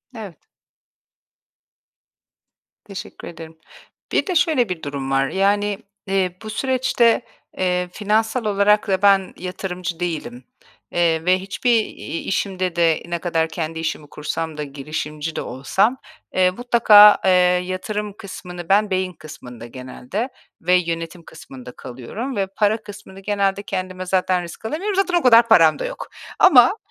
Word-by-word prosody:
Evet. 205 Hz, -7 st, -10 dB, 2.4 s
Teşekkür 205 Hz, +1 st, -9 dB
ederim. 165 Hz, -1 st, -10 dB, 0.5 s
Bir -, -, +1 dB
de 365 Hz, -, -1 dB
şöyle 300 Hz, -, +2 dB
bir 180 Hz, -3 st, -5 dB
durum 140 Hz, -2 st, -4 dB
var: 135 Hz, 0 st, +2 dB
Yani, 205 Hz, +1 st, +1 dB, 0.3 s
eee, 190 Hz, -2 st, 0 dB
bu 215 Hz, -, -7 dB
süreçte, 250 Hz, -1 st, +2 dB, 0.4 s
eee, 180 Hz, -1 st, 0 dB
finansal 220 Hz, +4 st, 0 dB
olarak 210 Hz, +1 st, +3 dB
da 190 Hz, -1 st, 0 dB
ben 195 Hz, -2 st, +4 dB
yatırımcı 180 Hz, -1 st, -5 dB
değilim, 155 Hz, -8 st, -4 dB, 0.5 s
eee, 165 Hz, -2 st, +1 dB
ve 185 Hz, +1 st, +3 dB
hiçbir 195 Hz, +6 st, -1 dB
i -, -, -7 dB
işimde 185 Hz, -2 st, -2 dB
de, 165 Hz, -2 st, +2 dB
ne 170 Hz, 0 st, -3 dB
kadar 165 Hz, -2 st, -1 dB
kendi 160 Hz, 0 st, -4 dB
işimi 160 Hz, -2 st, -4 dB
kursam 155 Hz, +1 st, -5 dB
da, 150 Hz, -, -3 dB
girişimci 150 Hz, +2 st, -5 dB
de -, -, -2 dB
olsam, 145 Hz, -, 0 dB, 0.4 s
eee, 185 Hz, -1 st, +3 dB
mutlaka, 215 Hz, -2 st, +7 dB
eee, 190 Hz, -, +5 dB, 0.3 s
yatırım 205 Hz, +3 st, -4 dB
kısmını 180 Hz, -3 st, -9 dB
ben 205 Hz, +2 st, +3 dB
beyin 185 Hz, -1 st, -1 dB
kısmında 125 Hz, -7 st, -11 dB
genelde 130 Hz, -, -6 dB, 0.3 s
ve 180 Hz, +2 st, +1 dB
yönetim 170 Hz, -1 st, -2 dB
kısmında 130 Hz, -6 st, -12 dB
kalıyorum 130 Hz, -, -7 dB
ve 195 Hz, -1 st, 0 dB
para 210 Hz, 0 st, +2 dB
kısmını 205 Hz, -2 st, -11 dB
genelde 200 Hz, 0 st, -1 dB
kendime 185 Hz, -1 st, -4 dB
zaten 185 Hz, -1 st, +1 dB
risk 170 Hz, +5 st, -10 dB
alamıyorum. 375 Hz, -, -2 dB
Zaten 375 Hz, -2 st, +1 dB
o -, -, -6 dB
kadar 235 Hz, -2 st, +6 dB
param 165 Hz, -9 st, +5 dB
da -, -, -3 dB
yok. -, -, -6 dB, 0.3 s
Ama 280 Hz, -, +6 dB
185 Hz, 140 wpm, -21 LUFS, 165-210 Hz, 2.4 s, mutlaka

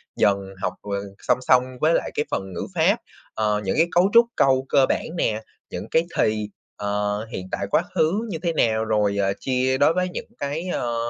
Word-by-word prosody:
dần 100 Hz, -1 st, +3 dB, 0.2 s
học, 90 Hz, -1 st, -1 dB
ờ, 100 Hz, -1 st, -3 dB, 0.2 s
song -, -, +2 dB
song 125 Hz, 0 st, +4 dB, 0.2 s
với 160 Hz, +2 st, +4 dB
lại -, -, 0 dB
cái 150 Hz, -, 0 dB
phần 95 Hz, -1 st, -3 dB
ngữ -, -, -4 dB
pháp, 180 Hz, +6 st, +4 dB, 0.4 s
ờ, 105 Hz, -1 st, 0 dB
những 95 Hz, -, -1 dB
cái 165 Hz, +2 st, +4 dB
cấu 180 Hz, +3 st, +4 dB
trúc 235 Hz, 0 st, +8 dB
câu 135 Hz, -1 st, +3 dB
cơ 135 Hz, -2 st, +5 dB
bản -, -, 0 dB
nè, 110 Hz, -5 st, 0 dB, 0.3 s
những -, -, -6 dB
cái 160 Hz, -, +4 dB
thì, 105 Hz, -1 st, +1 dB, 0.3 s
ờ, 105 Hz, +1 st, -1 dB
hiện 95 Hz, -3 st, -5 dB
tại, -, -, -2 dB
quá -, -, +4 dB
khứ 195 Hz, +9 st, +2 dB
như 165 Hz, -, -3 dB
thế 170 Hz, -1 st, 0 dB
nào, 110 Hz, -5 st, +1 dB
rồi, 105 Hz, -2 st, +1 dB
ờ, 100 Hz, -1 st, +1 dB
chia 130 Hz, 0 st, +1 dB
đối 145 Hz, +4 st, +4 dB
với 180 Hz, 0 st, 0 dB
những -, -, -6 dB
cái, 150 Hz, +6 st, -3 dB
ơ, 120 Hz, -1 st, -2 dB
125 Hz, 210 wpm, -23 LUFS, 105-160 Hz, 0.4 s, trúc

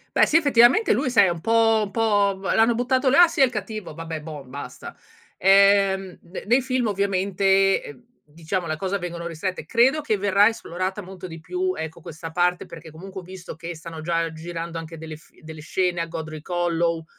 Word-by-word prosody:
Beh -, -, +5 dB
sì, 315 Hz, -, +4 dB
effettivamente 285 Hz, -, +4 dB
lui 255 Hz, -, 0 dB
sai 230 Hz, -5 st, +5 dB
è -, -, +2 dB
un 170 Hz, -2 st, -4 dB
po' 225 Hz, +1 st, +3 dB
un -, -, -9 dB
po' 205 Hz, -3 st, +1 dB
vo 195 Hz, -, -3 dB
l'hanno 225 Hz, +1 st, +3 dB
buttato 255 Hz, +2 st, +1 dB
là, 350 Hz, +7 st, +7 dB
sì 325 Hz, -, -2 dB
è -, -, +9 dB
il 255 Hz, -, -2 dB
cattivo, 215 Hz, -6 st, -6 dB
vabbè 165 Hz, -1 st, -6 dB
bon, 150 Hz, -4 st, -9 dB
basta. 130 Hz, -1 st, -9 dB, 0.4 s
Ehm, 195 Hz, -1 st, +4 dB
ne 180 Hz, -, -9 dB
nei 245 Hz, +5 st, +3 dB
film 255 Hz, -1 st, -1 dB
ovviamente, 195 Hz, -1 st, +2 dB
ehm, 140 Hz, -3 st, -12 dB, 0.2 s
diciamo 165 Hz, +4 st, -4 dB
le 155 Hz, -, -2 dB
cose 195 Hz, +3 st, -2 dB
vengono 170 Hz, -1 st, -6 dB
ristrette, 170 Hz, +3 st, -4 dB
credo 265 Hz, +6 st, +3 dB
che 285 Hz, -7 st, 0 dB
verrà 200 Hz, +1 st, +4 dB
esplorata 190 Hz, -2 st, -3 dB
molto 185 Hz, -1 st, -10 dB
di 165 Hz, -2 st, -8 dB
più, 365 Hz, -, -2 dB
ecco, 160 Hz, +1 st, -6 dB
questa 165 Hz, +1 st, -8 dB
parte 180 Hz, +2 st, 0 dB
perché 165 Hz, -1 st, -11 dB
comunque 190 Hz, +4 st, -9 dB
ho -, -, -16 dB
visto 185 Hz, -2 st, -10 dB
che 170 Hz, +2 st, -7 dB
stanno 160 Hz, 0 st, -9 dB
già 165 Hz, 0 st, -1 dB
girando 165 Hz, +1 st, -6 dB
anche 165 Hz, 0 st, -8 dB
delle 160 Hz, -1 st, -8 dB
f 155 Hz, -, -23 dB
delle 155 Hz, -1 st, -10 dB
scene 180 Hz, +2 st, -1 dB
a 165 Hz, -, -1 dB
Godric 155 Hz, -2 st, -7 dB
Hollow, 170 Hz, -2 st, 0 dB
185 Hz, 205 wpm, -23 LUFS, 165-210 Hz, 0.4 s, è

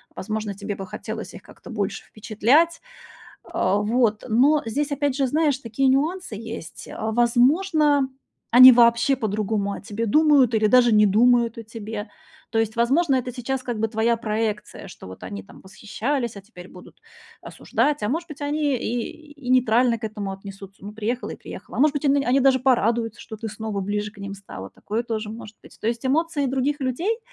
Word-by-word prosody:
Возможно, 215 Hz, 0 st, -4 dB
тебе 205 Hz, +1 st, -5 dB
бы 195 Hz, -, -7 dB
хотелось 185 Hz, -, -7 dB
их -, -, -11 dB
как-то -, -, -14 dB
больше -, -, -3 dB
впечатлять. 250 Hz, +11 st, +1 dB, 0.6 s
А, 190 Hz, +2 st, 0 dB
вот. 215 Hz, +1 st, +1 dB
Но 275 Hz, +7 st, +4 dB
здесь, 285 Hz, +6 st, -2 dB
опять 285 Hz, -1 st, 0 dB
же, 270 Hz, -1 st, 0 dB
знаешь, 295 Hz, -1 st, +1 dB
такие 250 Hz, +1 st, -1 dB
нюансы 300 Hz, -, 0 dB
есть, 225 Hz, -5 st, -8 dB
а. 220 Hz, 0 st, -4 dB
Возможно, 285 Hz, -, +3 dB, 0.4 s
они 255 Hz, +2 st, +11 dB
вообще 235 Hz, +2 st, +4 dB
по-другому 210 Hz, -3 st, -2 dB
о -, -, -8 dB
тебе 225 Hz, +2 st, -4 dB
думают 285 Hz, -2 st, +4 dB
или 215 Hz, -1 st, +3 dB
даже 240 Hz, +1 st, +5 dB
не 210 Hz, 0 st, +5 dB
думают 235 Hz, +3 st, +3 dB
о 230 Hz, -, -7 dB
тебе. 220 Hz, -1 st, -7 dB, 0.4 s
То 225 Hz, -, -1 dB
есть, 220 Hz, -1 st, 0 dB
возможно, 270 Hz, +6 st, +2 dB
это 255 Hz, -1 st, -1 dB
сейчас 255 Hz, +2 st, -3 dB
как 240 Hz, -3 st, -4 dB
бы 225 Hz, -, +1 dB
твоя 225 Hz, +1 st, +1 dB
проекция, 215 Hz, -2 st, -3 dB
что -, -, -12 dB
вот 95 Hz, -, -11 dB
они 95 Hz, +1 st, -7 dB
там -, -, -16 dB
восхищались, 230 Hz, +5 st, -4 dB
а 200 Hz, -, -7 dB
теперь 190 Hz, -3 st, -13 dB
будут 180 Hz, -, -15 dB, 0.4 s
осуждать, 295 Hz, -1 st, -1 dB
а 210 Hz, -, 0 dB
может 330 Hz, +7 st, -2 dB
быть, 300 Hz, -2 st, -10 dB
они 290 Hz, 0 st, 0 dB
и 270 Hz, +7 st, -5 dB
и 285 Hz, -4 st, -11 dB
нейтрально 245 Hz, -1 st, +3 dB
к 220 Hz, -, -9 dB
этому 210 Hz, -2 st, -4 dB
отнесутся. 195 Hz, 0 st, -11 dB
Ну, 205 Hz, -, -7 dB
приехала 225 Hz, +4 st, -3 dB
и -, -, -6 dB
приехала. -, -, -10 dB
А -, -, 0 dB
может 300 Hz, +1 st, +4 dB
быть 290 Hz, -, -3 dB
они, 280 Hz, 0 st, +3 dB
они 260 Hz, +3 st, +2 dB
даже 265 Hz, 0 st, +4 dB
порадуются, 235 Hz, -3 st, +1 dB
что 220 Hz, -, -9 dB
ты 220 Hz, +1 st, -6 dB
снова 210 Hz, -1 st, -4 dB
ближе 205 Hz, +2 st, -2 dB
к 210 Hz, -, -19 dB
ним 200 Hz, 0 st, -6 dB
стала. 190 Hz, -, -9 dB
Такое 225 Hz, +3 st, -4 dB
тоже 220 Hz, -2 st, -4 dB
может 220 Hz, -1 st, -10 dB
быть. -, -, -17 dB
То -, -, -4 dB
есть 230 Hz, +1 st, -2 dB
эмоции 300 Hz, +2 st, 0 dB
других 270 Hz, +3 st, -1 dB
людей 330 Hz, -, -1 dB
235 Hz, 190 wpm, -23 LUFS, 215-270 Hz, 0.6 s, они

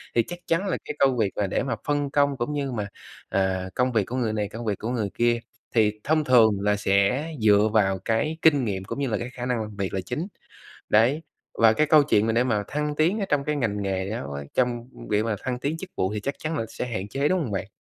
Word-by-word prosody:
thì 115 Hz, -, +4 dB
chắc 175 Hz, 0 st, -7 dB
chắn 175 Hz, +4 st, +1 dB
là -, -, 0 dB
cái 150 Hz, -, -5 dB
công 135 Hz, -2 st, +3 dB
việc 105 Hz, -4 st, +1 dB
mà 100 Hz, -, 0 dB
để -, -, -1 dB
mà 135 Hz, -, -1 dB
phân 145 Hz, -1 st, 0 dB
công 140 Hz, -2 st, +2 dB
cũng 125 Hz, +5 st, -2 dB
như 140 Hz, -2 st, -2 dB
mà, 105 Hz, -4 st, -3 dB, 0.4 s
à, 95 Hz, -1 st, 0 dB
công 125 Hz, 0 st, +2 dB
việc 110 Hz, -3 st, +2 dB
của 125 Hz, -, -5 dB
người 120 Hz, -4 st, 0 dB
này, 105 Hz, -2 st, -1 dB
công 115 Hz, +2 st, -7 dB
việc 105 Hz, -3 st, -1 dB
của 110 Hz, -, -3 dB
người 115 Hz, -5 st, -1 dB
kia 120 Hz, 0 st, +2 dB, 0.4 s
thì 105 Hz, -2 st, +3 dB
thông 155 Hz, +1 st, +2 dB
thường 120 Hz, -5 st, +6 dB
là 105 Hz, 0 st, +2 dB
sẽ 100 Hz, +8 st, +2 dB, 0.2 s
dựa 105 Hz, 0 st, +5 dB
vào 95 Hz, -3 st, +3 dB
cái 135 Hz, +8 st, 0 dB
kinh 145 Hz, -5 st, +4 dB
nghiệm 95 Hz, -3 st, -2 dB
cũng 120 Hz, -, -5 dB
như 140 Hz, -, 0 dB
là 110 Hz, -4 st, 0 dB
cái 120 Hz, +1 st, -5 dB
khả 125 Hz, -1 st, -6 dB
năng 125 Hz, -3 st, 0 dB
làm 105 Hz, -1 st, -7 dB
việc 100 Hz, -2 st, -3 dB
là 95 Hz, -, -1 dB
chính. 150 Hz, -, -4 dB, 0.6 s
Đấy, 120 Hz, +8 st, +4 dB, 0.4 s
và 110 Hz, -1 st, +6 dB
cái 155 Hz, +5 st, +2 dB
câu 155 Hz, -2 st, +6 dB
chuyện 110 Hz, -7 st, +3 dB
mà 115 Hz, -, +2 dB
để 120 Hz, +2 st, +3 dB
mà 105 Hz, -5 st, 0 dB
thăng 150 Hz, 0 st, -2 dB
tiến 170 Hz, +8 st, +2 dB
ở 200 Hz, -, 0 dB
trong 145 Hz, -1 st, +2 dB
cái 150 Hz, +1 st, -1 dB
ngành 105 Hz, -7 st, -1 dB
nghề 95 Hz, -1 st, -2 dB
đó 105 Hz, -10 st, -4 dB
quá 70 Hz, 0 st, -5 dB
trong 120 Hz, -1 st, 0 dB, 0.2 s
việc 105 Hz, +1 st, +2 dB
mà 110 Hz, -2 st, 0 dB
thăng 125 Hz, -1 st, -2 dB
tiến 145 Hz, +5 st, -2 dB
chức 185 Hz, +2 st, -8 dB
vụ 95 Hz, +2 st, 0 dB
thì 105 Hz, -, -2 dB
chắc 140 Hz, +7 st, -3 dB
chắn 155 Hz, 0 st, -3 dB
là 115 Hz, -, -1 dB
sẽ 125 Hz, -, -4 dB
hạn 100 Hz, -4 st, -4 dB
chế, 140 Hz, +7 st, 0 dB
đúng 185 Hz, +3 st, +2 dB
hông 125 Hz, -, -3 dB
bạn? 95 Hz, -1 st, -2 dB
120 Hz, 270 wpm, -25 LUFS, 105-140 Hz, 0.6 s, thường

